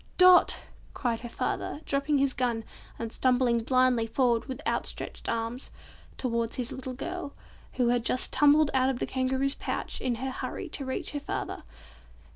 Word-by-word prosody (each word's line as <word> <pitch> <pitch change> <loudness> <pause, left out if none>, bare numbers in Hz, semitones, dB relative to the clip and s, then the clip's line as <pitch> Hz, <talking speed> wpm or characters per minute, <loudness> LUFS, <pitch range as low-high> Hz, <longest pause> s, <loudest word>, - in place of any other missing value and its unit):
"Dot!" 365 -1 +7 0.4
cried 235 -3 -1
her 240 - -7
father, 290 - -3
dropping 280 +1 +1
his 275 -1 +2
gun, 240 -3 0 0.3
and 230 -1 -5
stumbling 250 -2 +3
blindly 255 -1 +3
forward 235 0 +2
with 260 - -6
outstretched - - -3
arms, 230 +3 -2 0.5
towards 235 -2 -1
his 250 -3 -1
little 260 -1 -5
girl, 345 +1 -5 0.4
who 245 -2 +2
had 240 -1 +2
just 255 +2 0
tumbled 295 +2 +5
out 260 0 +3
of 265 - -1
the - - -1
Kangaroo's 265 +1 0
pouch - - -4
in 250 -2 0
her 260 +3 -3
hurry - - -5
to 275 - -3
reach 260 - -3
her 290 - -3
father. 285 - -4
255 Hz, 165 wpm, -28 LUFS, 235-275 Hz, 0.5 s, Dot